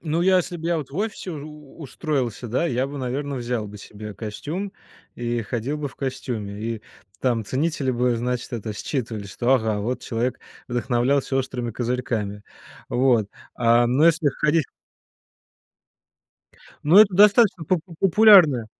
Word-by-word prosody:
Ну 165 +1 -1
я, 185 0 +4
если 175 0 -1
б 160 - -10
я 170 - +1
вот 140 -3 -7
в 150 - -8
офисе 205 -3 -3
у 150 -1 -10
устроился, 130 -6 -3
да, 130 +9 0
я 130 0 0
бы, 140 0 -7
наверное, 135 +2 -3
взял 120 -3 -3
бы 105 - -10
себе 105 +1 -9
костюм 150 - -5 0.4
и 120 -1 -2
ходил 120 +7 -3
бы 150 -1 -4
в - - -16
костюме, 110 -6 -4
и 115 -1 -4 0.4
там 120 -4 0
ценители 135 +3 -1
бы, 120 0 +1
значит, 125 +2 -3
это 110 -2 -4
считывали, 110 -2 -4
что, 120 +6 +1
ага, 110 -4 0
вот 125 +5 -2
человек 120 +2 -2 0.3
вдохновлялся 125 +2 0
"Острыми 125 -2 -2
козырьками". 115 -4 -3 0.5
Вот. 120 -5 +2 0.3
А, 120 0 +4
ну 130 +6 +3
если 165 -2 +4
ходить 150 0 +1 2.2
ну, 165 +7 +6
это 205 -3 +7
достаточно 205 -2 +5
попо 175 +2 0
пулярная, 175 - +6
130 Hz, 150 wpm, -23 LUFS, 115-155 Hz, 2.2 s, это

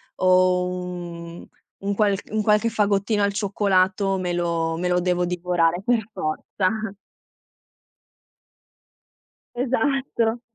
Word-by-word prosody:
o 185 0 +3
un 175 -2 -6 0.3
un 200 +1 -2
qualc 200 -1 0
un 215 0 0
qualche 210 +2 +3
fagottino 205 -1 +1
al 200 0 +1
cioccolato 195 -1 +1
me 180 -1 -2
lo 170 -2 -1
me 180 +1 -1
lo 180 0 +2
devo 180 0 +1
divorare 175 -1 0
per 225 -3 +1
forza. 200 +6 -2 2.6
Esatto. 245 -2 0
190 Hz, 100 wpm, -23 LUFS, 180-210 Hz, 2.6 s, o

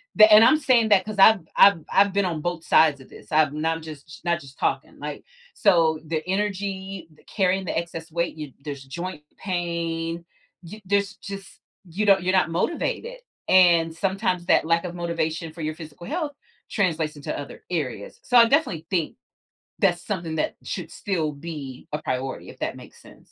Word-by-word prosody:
the 215 0 +8
and 215 +1 +9
I'm 305 +6 +5
saying 245 -6 +3
that 195 -2 +4
'cause 215 -1 -6
I've 215 +2 +7 0.2
I've 200 -4 +7
I've 200 0 +4
been 200 0 +2
on 165 -4 -2
both 175 -1 -3
sides 150 -5 +4
of 130 - -16
this, - - -14
I'm 150 -1 +2
not 165 0 0
just 155 0 -11
not 170 0 +1
just 135 -3 -15
talking, - - -2
like, - - -6 0.3
so 165 -5 +3
the 155 0 -2
energy, 195 -1 -3
the - - -24
carrying 190 -1 0
the - - -3
excess 165 -1 -5
weight, 170 -1 -1
you 150 -3 -7
there's 140 -2 -6
joint 170 +3 -6
pain, 170 -2 -3 0.4
you 195 +6 -10
there's 200 +1 0
just 195 -1 -10 0.3
you 200 +6 -2
don't 195 -1 +5
you're 185 - +1
not 185 -3 +2
motivated, 340 - -2 0.3
and 170 -3 +5
sometimes 190 -1 -1
that - - +3
lack 165 +2 +1
of 175 - -5
motivation 165 -1 -2
for 165 +1 -10
your 155 0 -2
physical 160 +1 -11
health 310 -2 -3 0.4
translates 160 -6 0
into 145 - -5
other 145 - -9
areas 130 - -4
so, 245 - +3
I 235 - +9
definitely 230 - +1
think 170 -4 -1 0.6
that's 175 -3 +1
something 170 -6 -3
that 155 - -1
should 175 -4 -5
still 165 -7 -2
be 140 -4 -8
a 150 - -2
priority, 130 +1 -4
if - - -13
that - - -3
makes - - -14
sense. - - -18
170 Hz, 185 wpm, -24 LUFS, 160-195 Hz, 0.6 s, and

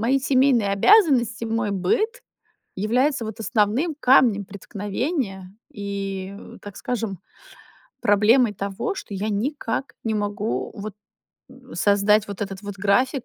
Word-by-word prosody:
мои 255 +5 +2
семейные 260 -5 +3
обязанности, 240 - +4
мой 225 -2 -1
быт, 420 - 0 0.5
являются 245 +6 +1
вот 220 +1 -7
основным 225 +9 +1
камнем 245 -5 +5
преткновения 200 - -4 0.2
и, 195 -1 -5
э, - - -12
так 205 -2 -10
скажем, 220 -7 -3 0.8
проблемой 215 +3 +4
того, 200 - -3
что 210 - -8
я 200 +2 -2
никак 235 +4 -2
не 220 -1 -1
могу 205 +1 -2
вот, 210 -1 -6 0.6
м, - - -14
создать 205 +1 +3
вот 200 0 -7
этот 195 0 -6
вот 205 -1 -6
график, 220 +7 +1
215 Hz, 125 wpm, -23 LUFS, 200-250 Hz, 0.8 s, камнем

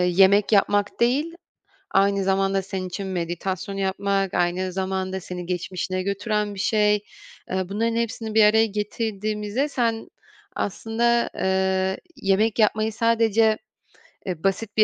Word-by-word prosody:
yemek 190 +4 +4
yapmak 205 0 +2
değil, 285 +8 +1 0.6
aynı 200 0 +3
zamanda 195 0 +1
senin 190 -1 -5
için 190 +2 -5
meditasyon 185 +2 -3
yapmak, 195 0 0
aynı 180 +1 0
zamanda 190 0 -2
seni 180 -1 -7
geçmişine 185 +1 -3
götüren 205 +1 -1
bir - - -8
şey. 210 0 +3 0.6
Eee, 185 0 -1
bunların 230 +3 0
hepsini 230 -1 -2
bir 220 - +7
araya 220 +1 +5
getirdiğimizde 210 +4 -2
sen 230 -4 -1 0.5
aslında, 235 +4 0
eee, 190 0 +1 0.2
yemek 205 +3 +1
yapmayı 215 0 +2
sadece, 225 -1 +3 0.7
eee, 180 -3 -4
basit 200 +3 -1
bir 215 - +7
200 Hz, 125 wpm, -24 LUFS, 190-220 Hz, 0.7 s, bir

